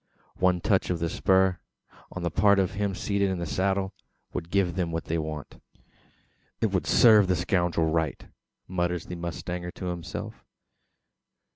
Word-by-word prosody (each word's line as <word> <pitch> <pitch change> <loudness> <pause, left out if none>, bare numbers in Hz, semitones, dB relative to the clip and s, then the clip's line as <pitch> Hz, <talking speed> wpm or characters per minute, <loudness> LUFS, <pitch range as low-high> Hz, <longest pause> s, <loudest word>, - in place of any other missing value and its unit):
One 90 -1 +3
touch 95 -1 +1
of 90 - 0
the 85 0 -2
spur, 95 -1 +3 0.5
on 90 - -6
the 85 - -1
part 100 +3 +4
of 95 -2 +2
him 100 -2 -2
seated 100 0 0
in 95 - -1
the 85 - -3
saddle, 95 +5 0 0.4
would 80 - -4
give 95 -2 +1
them 90 -3 -1
what 80 0 -2
they 80 0 -1
want. 75 -2 -6 1.0
"It - - +1
would - - -1
serve 110 -4 +6
the 90 - +2
scoundrel 85 -1 +1
right," 80 -2 -1 0.4
mutters 90 -1 -1
the 90 - -6
mustanger 85 +1 -5
to - - -7
himself. 105 +5 -5
90 Hz, 160 wpm, -27 LUFS, 85-95 Hz, 1.0 s, serve